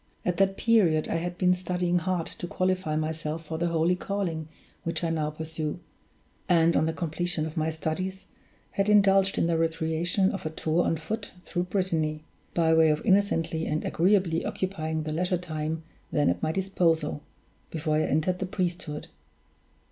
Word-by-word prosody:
At 180 -1 0
that 195 0 +2
period 185 -10 +3
I - - +1
had 175 +1 -3
been 180 -1 +4
studying 180 -1 0
hard 175 -1 -1
to 175 - -6
qualify 185 -3 0
myself 155 +1 -2
for 160 +1 -4
the 170 - +1
holy 165 +1 +2
calling 180 -5 -3 0.4
which 165 +1 -2
I 165 - +1
now 155 -2 0
pursue; 155 +1 -4 0.7
and, 170 -1 +4
on 160 - +3
the - - +1
completion 170 0 -2
of 160 - -6
my 160 0 +1
studies, 165 +4 -3 0.5
had 200 +1 0
indulged 195 -2 +5
in - - +3
the 165 -1 +1
recreation 165 +4 +1
of 195 - -5
a 155 - -2
tour 160 +2 0
on 165 - +1
foot 215 +6 -5
through 175 0 -1
Brittany, 160 -5 -1 0.3
by 165 -1 +4
way 160 -1 +6
of 150 0 0
innocently 165 -5 +2
and 155 +1 -1
agreeably 180 -2 +2
occupying 160 -4 -2
the 155 0 -3
leisure 180 +3 +1
time 160 -2 -3 0.3
then 145 -10 +3
at 85 - -4
my - - +1
disposal, 165 -5 +1 0.5
before 155 -1 0
I - - +3
entered 160 +5 +1
the 190 - -2
priesthood. 175 -5 -3
165 Hz, 170 wpm, -27 LUFS, 160-185 Hz, 0.7 s, way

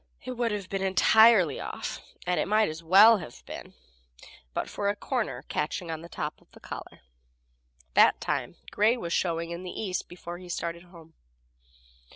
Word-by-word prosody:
It 255 - -5
would 240 -2 -1
have 205 -3 -4
been 195 0 -3
entirely 190 - +5
off - - -5 0.2
and 180 0 +1
it - - 0
might 215 +1 +3
as 155 +1 -7
well 200 +7 +7
have 140 -9 -11
been - - -9 0.8
but - - -3
for 200 - -2
a 205 - 0
corner 205 - -3
catching 165 +3 -3
on 160 -1 -5
the 170 - -11
top 150 -2 -5
of - - -27
the - - -15
collar. - - -9 0.9
That - - +5
time - - -2 0.2
gray 220 +4 +3
was 170 -7 -4
showing 170 -1 -1
in 170 +1 -5
the 180 -1 -7
east 190 -4 -3
before 175 0 -8
he 180 -1 -12
started 170 0 -3
for 180 - -18
home. 165 -2 -15
180 Hz, 185 wpm, -28 LUFS, 170-210 Hz, 0.9 s, well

